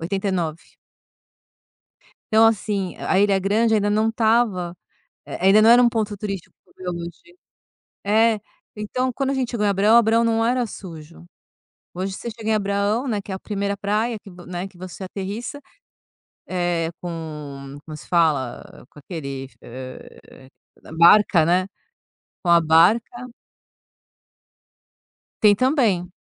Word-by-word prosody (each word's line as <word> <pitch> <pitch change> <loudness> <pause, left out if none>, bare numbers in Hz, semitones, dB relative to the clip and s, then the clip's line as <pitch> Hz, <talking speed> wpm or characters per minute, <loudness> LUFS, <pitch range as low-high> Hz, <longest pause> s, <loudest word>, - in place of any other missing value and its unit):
89. 175 -3 -2 1.7
Então, 220 +1 +6
assim, 200 -3 -1
a 190 - 0
Ilha 200 -1 +3
Grande 220 +4 +2
ainda 205 -1 +1
não 215 +2 +2
estava, 220 -6 +1 0.5
eh, - - -6
ainda 210 +2 +6
não 225 - +6
era 245 +1 +7
um 240 - +5
ponto 215 -3 -2
turístico 195 -3 -6
como - - -29
é - - 0
hoje. 175 - -9 0.7
É, 220 +1 +3 0.4
então, 250 +5 -2
quando 275 +2 -2
a - - 0
gente 255 -2 -2
chegou 210 -4 -1
em - - +3
Abraão, 205 +4 +4
Abraão 230 0 +4
não 225 0 +1
era 245 +1 +1
sujo. 170 -4 -11 0.7
Hoje 190 +2 -4
você 235 - -6
chega 220 -1 -6
em - - +3
Abraão, 205 +4 0
né, 210 -4 -1
que 195 - -10
é - - -2
a - - -7
1º 200 -1 -3
praia 215 +3 -1
que 200 - -14 0.2
né, 180 +1 -5
que 190 -2 -20
você 185 +1 -9
aterrissa, 205 +8 -6 0.9
eh, 175 -2 -1
com 150 -5 -7
como 155 -1 -8
se - - -13
fala? 150 -11 0
Com - - -17
aquele, 140 -4 -7
eh, 130 +1 -11 0.5
barca, 170 -1 +6
né. 180 +3 +2 0.8
Com 175 - 0
a 170 0 +6
barca 215 +10 +3 2.2
Tem 205 -1 +6
também, 225 - +1
200 Hz, 140 wpm, -22 LUFS, 170-225 Hz, 2.2 s, era